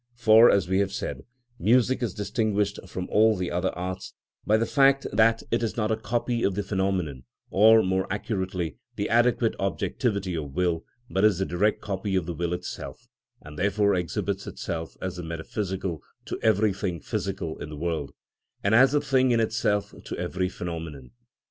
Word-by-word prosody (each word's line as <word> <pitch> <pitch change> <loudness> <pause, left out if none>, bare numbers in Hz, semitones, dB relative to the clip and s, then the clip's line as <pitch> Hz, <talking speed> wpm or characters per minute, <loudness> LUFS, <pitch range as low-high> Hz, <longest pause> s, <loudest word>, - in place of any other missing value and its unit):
For, 115 -1 +7
as 95 -3 +3
we 95 +1 +1
have 100 -1 +1
said, - - -5 0.3
music 125 +7 +3
is 115 -7 -2
distinguished 105 -1 -1
from 90 0 -5
all 110 0 +4
the 90 -1 -2
other 90 0 0
arts 90 +1 -5 0.3
by 110 - +5
the 115 - +1
fact 135 +1 +4
that 115 +1 +4
it 115 - +1
is 115 0 -2
not 110 -1 0
a - - +3
copy 120 +1 -2
of 100 -4 +1
the 105 - -1
phenomenon, 95 -9 -1 0.3
or, 110 +3 +6
more 95 +1 -1
accurately, 95 - -3 0.2
the - - -2
adequate 120 0 +3
objectivity 100 +2 -1
of 75 -4 -5
will, 85 -3 0 0.3
but 95 - +1
is 105 -4 +5
the 95 - 0
direct 100 +5 +1
copy 95 0 -3
of 95 -3 +1
the 85 - -4
will 85 +1 -2
itself, 90 0 -7 0.4
and 75 0 -10
therefore 100 +1 +2
exhibits 90 -4 -2
itself 80 -1 -5
as 95 -1 -3
the 90 - -5
metaphysical 90 +1 -4 0.2
to - - -5
everything 100 -4 +1
physical 90 -1 -4
in - - -6
the 75 - -7
world, 80 -3 -2 0.5
and 100 - +2
as 130 +4 +6
the 145 - +3
thing 130 -3 +2
in 120 -1 +3
itself 105 -3 0
to - - -5
every 90 +1 -2
phenomenon. 80 -8 -6
95 Hz, 180 wpm, -26 LUFS, 90-110 Hz, 0.5 s, For